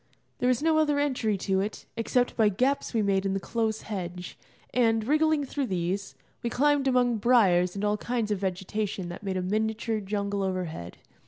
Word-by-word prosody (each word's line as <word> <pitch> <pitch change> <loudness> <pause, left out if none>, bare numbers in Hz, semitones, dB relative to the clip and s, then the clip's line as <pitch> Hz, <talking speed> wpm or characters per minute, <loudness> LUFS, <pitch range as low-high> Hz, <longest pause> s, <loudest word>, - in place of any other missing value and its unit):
There 250 - +1
was 255 +2 +2
no 320 -1 +4
other 295 -2 +2
entry 255 -8 0
to 190 0 0
it 205 +2 -3
except 245 +2 0
by 220 -2 +4
gaps 255 +8 0
we 225 -3 +1
made 195 -1 +1
in 195 -1 0
the - - 0
close 220 +2 -1
hedge, 180 -3 -6 0.4
and, 225 -3 +2
wriggling 310 0 +3
through 275 0 -2
these, 185 +1 -2 0.3
we 235 - -1
climbed 285 +2 +2
among 245 -2 +3
briars 195 -6 +4
and 200 +1 -2
all 210 0 +1
kinds 235 -2 -2
of 205 - 0
vegetation 190 0 -3
that 175 - -7
made 195 -2 -2
a 185 - -1
miniature 220 +3 -1
jungle 200 0 -2
overhead. 180 - -4
215 Hz, 185 wpm, -27 LUFS, 190-250 Hz, 0.4 s, no